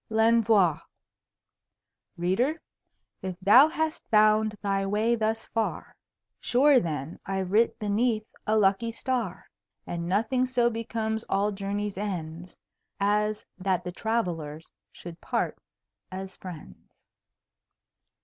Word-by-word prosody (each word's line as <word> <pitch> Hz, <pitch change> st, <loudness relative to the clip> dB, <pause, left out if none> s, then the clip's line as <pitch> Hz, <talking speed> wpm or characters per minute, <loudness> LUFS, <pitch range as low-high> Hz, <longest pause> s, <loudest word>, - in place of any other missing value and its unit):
L'ENVOI 220 Hz, -7 st, +3 dB, 1.4 s
Reader, 235 Hz, -, 0 dB, 0.6 s
if 185 Hz, -1 st, -5 dB
thou 210 Hz, +10 st, +7 dB
hast 315 Hz, 0 st, -3 dB
found 215 Hz, 0 st, +4 dB
thy 195 Hz, -1 st, 0 dB
Way 210 Hz, +4 st, +1 dB
thus 225 Hz, -1 st, -1 dB
far, 225 Hz, -1 st, -3 dB, 0.4 s
Sure 270 Hz, +2 st, +4 dB
then 155 Hz, -, -4 dB
I've 190 Hz, -1 st, -3 dB
writ 225 Hz, +3 st, +3 dB
beneath 215 Hz, +1 st, 0 dB, 0.2 s
a 215 Hz, +1 st, +3 dB
lucky 205 Hz, +3 st, +2 dB
Star; 230 Hz, -6 st, -3 dB, 0.4 s
And 170 Hz, 0 st, -4 dB
Nothing 235 Hz, +6 st, +1 dB
so 245 Hz, -2 st, +2 dB
becomes 220 Hz, -1 st, -3 dB
all 200 Hz, +2 st, +1 dB
Journeys' 200 Hz, 0 st, -3 dB
Ends 175 Hz, -3 st, -5 dB, 0.4 s
As 210 Hz, +1 st, +1 dB
that 185 Hz, -2 st, 0 dB
the 180 Hz, -, -5 dB
Travellers 170 Hz, -8 st, -3 dB, 0.2 s
should 170 Hz, -1 st, -10 dB
part -, -, -2 dB, 0.5 s
as 190 Hz, 0 st, -7 dB
Friends. 175 Hz, -5 st, -11 dB
210 Hz, 110 wpm, -27 LUFS, 185-225 Hz, 1.4 s, thou